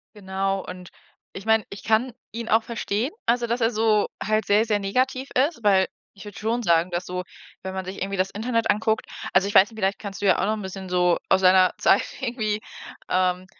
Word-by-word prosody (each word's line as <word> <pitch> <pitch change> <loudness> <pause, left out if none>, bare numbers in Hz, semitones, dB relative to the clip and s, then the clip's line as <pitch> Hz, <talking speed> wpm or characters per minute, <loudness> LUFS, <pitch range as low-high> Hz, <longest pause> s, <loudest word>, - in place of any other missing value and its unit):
Genau 195 -1 -2
und 180 0 -9 0.4
ich 195 +3 -8
meine, 220 -1 +3
ich 200 - -9
kann 225 +4 +1 0.2
ihn 230 0 -5
auch 225 +1 +4
verstehen, 230 +2 -2
also, 240 0 +1
dass 235 +1 -1
er 225 - +3
so 215 -2 +2 0.2
halt 215 0 +1
sehr, 210 +3 +3
sehr 210 -2 +1
negativ 255 +6 -1
ist, 275 0 +1
weil 190 -2 +4 0.3
ich 200 +1 -13
würde 205 - -9
schon 230 +3 -1
sagen, 170 -3 +2
dass 175 +1 -3
so, 180 0 -4 0.4
wenn 190 - -5
man 190 -1 -5
sich 190 0 -6
irgendwie 195 0 -3
das 185 +1 +1
Internet 230 +1 -1
anguckt 220 +1 0 0.3
also, 195 +1 +3
ich - - -5
weiß 200 +4 +7
nicht, 220 - -14
vielleicht 195 0 0
kannst 200 -2 -7
du 205 - -1
ja 190 - +4
auch - - +1
noch 215 - +1
'n - - -6
bisschen 190 -1 -7
so 180 -1 +3
aus 190 - +5
seiner 185 0 +5
Zeit - - +4 0.2
irgendwie, 220 -4 -2 0.5
ähm, 185 0 +1
205 Hz, 220 wpm, -24 LUFS, 190-225 Hz, 0.5 s, weiß